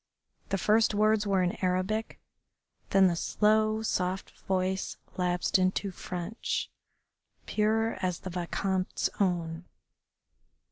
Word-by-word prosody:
The 195 - +1
first 215 +3 +3
words 215 0 +3
were 195 -2 +3
in 180 +1 -2
Arabic, 185 +4 -1 0.7
then 195 -1 +5
the 175 -2 +3
slow, 215 +4 +2
soft 185 -2 -1 0.2
voice 190 0 -1 0.2
lapsed 180 +1 +1
into 185 +2 +1
French, 180 +4 -4 0.7
pure 220 +1 +1
as 180 -2 -1
the 185 - -6
Vicomte's 185 +2 -1
own. 175 -3 0
190 Hz, 105 wpm, -29 LUFS, 180-215 Hz, 0.7 s, then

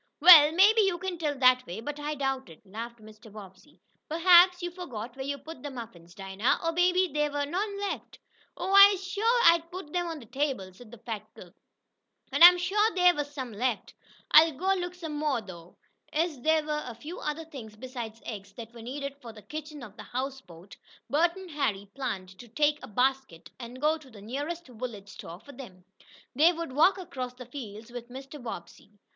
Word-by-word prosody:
"Well, 310 -2 +10
maybe 410 +6 +5
you 385 -4 +1
can 365 -1 -5
tell 295 -3 -2
that 255 -1 +5
way, 180 +5 -6
but 290 +6 -6
I 300 +1 -3
doubt 270 -1 -2
it," 160 - -16
laughed 230 +4 -8
Mr. 215 0 -15
Bobbsey. 200 +6 -14 0.3
"Perhaps 355 +2 +5
you 350 - -3
forgot 245 - -8
where 265 - -6
you 280 0 -3
put 280 0 -11
the 290 - -5
muffins, 210 -9 -10
Dinah, 195 +4 -1
or 330 - +2
maybe 360 +2 +2
there 295 0 +1
were 285 0 -1
none 400 +6 -3
left." 405 0 -5 0.4
"Oh, 380 +2 -2
I'se 395 -1 +8
shuah 450 +5 +1
I 335 0 +7
done 335 +1 -21
put 360 -3 -8
'em 350 -1 0
on 330 -1 -5
de 240 - -13
table," 250 -6 -3
said 230 +4 -15
the 240 - -12
fat 215 -2 -7
cook, 175 -1 -14 0.8
"an' - - -2
I'se 355 +1 +10
shuah 415 +4 +1
dey 360 -1 +6
was 290 -4 -4
some 260 -5 -6
left. 235 +1 -2 0.4
I'll 320 +1 +7
go 375 +7 0
look 355 -1 -4
some 320 -4 -6
mo', 295 -5 0
though." 175 -5 -12 0.3
As 310 -4 -1
there 315 +2 +2
were 300 0 -2
a 240 - -7
few 305 +10 -9
other 305 +2 -4
things 240 -9 -10
besides 235 -2 -8
eggs 200 -3 -8
that 230 +1 -10
were 235 - -11
needed 280 +4 -6
for 235 -3 -9
the 215 -1 -14
kitchen 300 +4 -8
of 215 -3 -12
the - - -8
houseboat, 240 -9 -7 0.4
Bert 340 +4 +2
and 380 -2 -10
Harry 205 -9 -2
planned 195 -9 -5
to 245 - -11
take 295 +5 +1
a - - -9
basket, 255 -5 -1
and 245 +1 -9
go 310 +3 +1
to 285 -4 -17
the 220 -4 -14
nearest 290 +9 -5
village 230 -5 -8
store 170 -2 -10
for 285 - -13
them. 210 -9 -12 0.5
They 310 +6 +5
would 335 -4 -6
walk 325 +8 +4
across 255 -9 -6
the 250 0 -10
fields 230 -3 -9
with 240 0 -8
Mr. 270 +3 -10
Bobbsey. 210 -2 -9
275 Hz, 205 wpm, -28 LUFS, 225-330 Hz, 0.8 s, Well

